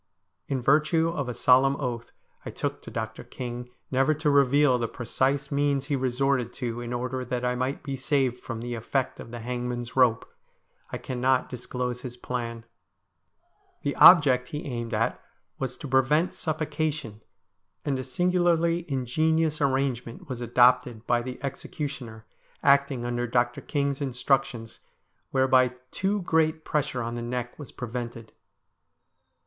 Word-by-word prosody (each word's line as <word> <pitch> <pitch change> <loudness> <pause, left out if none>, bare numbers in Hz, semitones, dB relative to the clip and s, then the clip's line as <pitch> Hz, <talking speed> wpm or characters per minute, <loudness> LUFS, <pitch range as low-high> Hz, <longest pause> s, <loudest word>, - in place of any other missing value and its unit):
In 130 -3 -2
virtue 155 +5 +3
of 140 -6 -3
a - - -2
solemn 130 +2 +5
oath 120 -4 -4 0.3
I - - -6
took - - -3
to - - -10
Dr. 110 -1 -5
King 125 -1 -6 0.2
never 135 +4 +3
to 150 0 +1
reveal 140 -1 +4
the 115 - 0
precise 135 +5 -1
means 140 -1 +1
he - - +4
resorted 130 -1 0
to 120 -2 -4
in 120 0 -5
order 125 +1 -2
that 125 0 -3
I 125 - +1
might 130 +2 -2
be 140 -1 -3
saved 130 -2 0
from 115 -2 -6
the 120 0 -4
effect 120 +3 -2
of - - -9
the 120 0 -7
hangman's 120 0 -4
rope, 125 -4 +3 0.6
I - - -3
cannot 130 0 0
disclose 125 0 -4
his 125 -1 -7
plan. 115 -2 -4 1.2
The 145 - -1
object 135 -8 +8
he 150 +2 -6
aimed 120 -4 -3
at - - 0 0.4
was 130 -2 -3
to 150 - -7
prevent 135 +6 +3
suffocation, 155 -7 -3 0.6
and 135 -2 0
a - - -3
singularly 170 +2 +1
ingenious 155 +5 +1
arrangement 135 +1 -1
was 125 -3 -5
adopted 120 -1 +3
by 120 -1 +2
the 125 +1 -6
executioner, 135 -5 -5 0.4
acting 140 -3 +3
under 120 0 -1
Dr. 120 +1 +1
King's 140 -1 -1
in 135 -3 -2
structions, 125 -3 0 0.5
whereby 130 -1 +3 0.2
too 195 +1 -1
great 160 -1 +1
pressure 145 -5 -1
on 115 +1 -4
the 120 - -4
neck 120 +2 -4
was 145 - -8
pre 125 - -6
vented. 115 -1 -6
130 Hz, 150 wpm, -27 LUFS, 120-140 Hz, 1.2 s, object